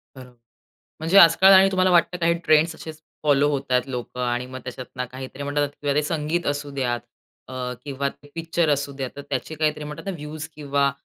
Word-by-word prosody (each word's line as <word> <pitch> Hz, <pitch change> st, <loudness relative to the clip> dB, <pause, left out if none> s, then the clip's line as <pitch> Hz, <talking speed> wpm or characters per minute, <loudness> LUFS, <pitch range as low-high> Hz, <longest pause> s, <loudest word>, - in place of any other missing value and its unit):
बरोबर. 125 Hz, -2 st, -13 dB, 0.7 s
म्हणजे 165 Hz, +5 st, +1 dB
आजकाल 190 Hz, +2 st, +8 dB
आणि 190 Hz, 0 st, +7 dB
तुम्हाला 185 Hz, -1 st, +2 dB
वाटतं, 175 Hz, 0 st, +3 dB
काही 170 Hz, 0 st, +2 dB
ट्रेंड्स 155 Hz, +1 st, +4 dB
असेच 160 Hz, -1 st, -10 dB, 0.2 s
फॉलो 145 Hz, -1 st, +3 dB
होत 140 Hz, -2 st, -1 dB
आहेत 125 Hz, 0 st, +4 dB
लोकं 125 Hz, -1 st, -5 dB
आणि 125 Hz, 0 st, -1 dB
मग 130 Hz, 0 st, -8 dB
त्याच्यातून 125 Hz, 0 st, -6 dB
काहीतरी 130 Hz, +2 st, -8 dB
म्हणतात 145 Hz, +1 st, -1 dB
ना -, -, -17 dB
किंवा 145 Hz, -1 st, 0 dB
ते 150 Hz, -, +2 dB
संगीत 155 Hz, +2 st, -2 dB
असू 145 Hz, 0 st, -2 dB
द्यात 125 Hz, -4 st, -2 dB, 0.5 s
अ, -, -, -10 dB, 0.3 s
किंवा 140 Hz, -1 st, -2 dB
ते 145 Hz, +1 st, -14 dB
पिक्चर 165 Hz, 0 st, -1 dB
असू 140 Hz, 0 st, 0 dB
द्या. 135 Hz, -2 st, -3 dB
तर -, -, -6 dB
त्याचे 140 Hz, +3 st, -3 dB
काहीतरी 150 Hz, -1 st, -1 dB
म्हणतात 150 Hz, 0 st, -8 dB
ना, 195 Hz, -, -1 dB
व्ह्यूज 150 Hz, +1 st, -7 dB
किंवा 140 Hz, -2 st, 0 dB
145 Hz, 200 wpm, -23 LUFS, 135-160 Hz, 0.7 s, आजकाल